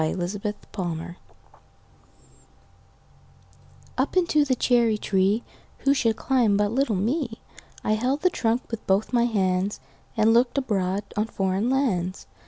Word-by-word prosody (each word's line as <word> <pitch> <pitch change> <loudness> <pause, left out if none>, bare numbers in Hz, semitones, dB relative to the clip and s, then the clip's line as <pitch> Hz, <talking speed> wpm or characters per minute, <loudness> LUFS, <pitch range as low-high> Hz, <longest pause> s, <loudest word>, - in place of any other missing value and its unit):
Foreign 155 +4 -1
Lands 180 -3 -4 2.8
UP - - 0
into 335 -4 +3
the 265 -3 +1
cherry 235 -3 +2
treeWho 200 +2 +1 0.5
should 230 -5 +1
climb 230 -3 +2
but 205 0 +1
little 255 -2 +1
me?I 225 - -4
held 255 +7 0
the 365 - +3
trunk 230 +1 0
with 230 - -6
both 195 +5 +1
my 240 -1 +3
handsAnd 190 -2 0 0.5
looked 240 +3 +3
abroad 200 -6 0
on 215 +1 0
foreign 195 +2 -1
lands. 195 -10 0
215 Hz, 115 wpm, -25 LUFS, 190-245 Hz, 2.8 s, into